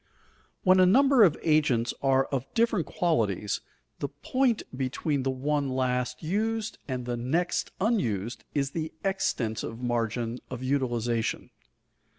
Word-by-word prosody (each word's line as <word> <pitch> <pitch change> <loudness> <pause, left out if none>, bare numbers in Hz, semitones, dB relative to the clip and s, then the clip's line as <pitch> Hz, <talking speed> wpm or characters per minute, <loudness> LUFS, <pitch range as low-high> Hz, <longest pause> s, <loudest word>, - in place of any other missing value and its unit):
When 185 -1 +5
a 185 - +7
number 270 +5 +5
of 175 -8 +6
agents 145 -7 +2
are 135 -1 +3
of 135 -1 -3
different 225 -6 +2
qualities, 105 - 0 0.4
the 140 - -1
point 235 - 0
between 135 +2 -1
the 135 - -1
one 140 +2 0
last 130 0 -1
used 220 +6 -1
and 130 -3 -3
the 120 0 -2
next 160 +9 0
unused 125 - 0
is 140 -1 0
the 160 0 -3
extensive 115 - -1
margin 120 0 -1
of 125 0 -6
utilization. 120 -4 -1
135 Hz, 130 wpm, -28 LUFS, 120-180 Hz, 0.4 s, a